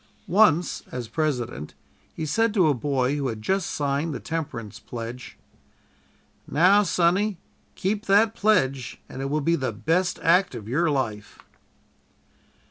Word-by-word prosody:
Once, 180 -4 +3
as 125 -2 -5
President, 125 - -3 0.4
he 160 - -3
said 225 +8 +1
to 185 -6 +4
a 150 - +4
boy 135 +1 0
who 140 -2 -1
had 110 -3 -4
just 190 - -1
signed 145 +2 -1
the - - -4
temperance 115 -9 -5
pledge: 120 +2 -8 1.1
"Now, 185 +7 +5
Sonny, 185 +2 +1 0.4
keep 205 +3 -2
that 210 +3 +4
pledge 135 - +1
and 130 - -7
it 135 - -2
will 150 +2 0
be 165 +4 +2
the 130 -6 -2
best 165 - 0
act 180 +3 +3
of 105 - -8
your 160 +8 +1
life." 110 -8 -3
150 Hz, 140 wpm, -25 LUFS, 125-185 Hz, 1.1 s, Now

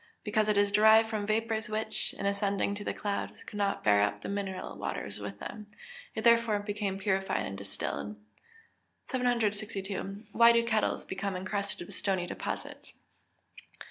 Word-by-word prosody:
_ - - -29 0.2
Because 215 0 +1
it 210 - +3
is 205 0 +4
derived 220 +2 +6
from 210 -2 -2
vapours 220 0 0
which, 215 0 -2
in - - -4
ascending 200 0 +1
to 205 0 -5
the - - -1
clouds, 205 -1 -3
could 210 - -8
not 200 -1 0
bear 100 -1 +5
up 105 0 0
the - - -4
mineral 200 -2 -3
waters - - -4
with 100 0 -6
them. 210 - -7 0.5
It 220 - -2
therefore 230 -2 +5
became 205 -1 -2
purified 195 -1 0
or 100 - -5
distilled. 100 +1 -4 0.9
762. 210 -5 -1
_Why 235 0 +7
do 235 0 +3
kettles 220 -2 +1
become 195 0 -3
encrusted 195 0 -3
with - - -11
stony 190 -3 0
deposits? - - -6
205 Hz, 160 wpm, -30 LUFS, 195-220 Hz, 0.9 s, Why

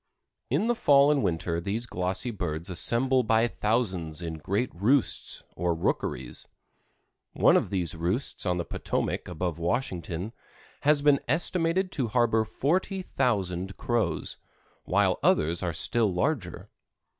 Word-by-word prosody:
In - - +1
the 240 - +2
fall 145 -9 +5
and 145 -2 +2
winter 85 -3 -1
these 105 +6 -2
glossy 95 +4 -2
birds 85 -4 -4
assemble 125 +9 +2
by 115 0 +3
thousands 95 -9 -1
in 80 -2 -5
great 100 +10 -1
roosts, 115 +9 +1
or 85 0 0
rookeries; 65 -6 -2 0.9
one - - +5
of - - +2
these 90 -5 -1
roosts 90 +10 -1
on 90 -1 +1
the 85 - -2
Potomac - - -2
above 85 -1 -3
Washington 90 0 -2 0.5
has 145 0 +3
been 145 -2 +5
estimated 170 +5 0
to 130 -9 -1
harbor 115 -1 +2
40,000 125 - -1
Crows, 110 -10 -1 0.5
while - - +2
others 80 +3 +2
are 90 - -1
still 105 +5 +1
larger. 95 - -2
105 Hz, 130 wpm, -27 LUFS, 85-130 Hz, 0.9 s, fall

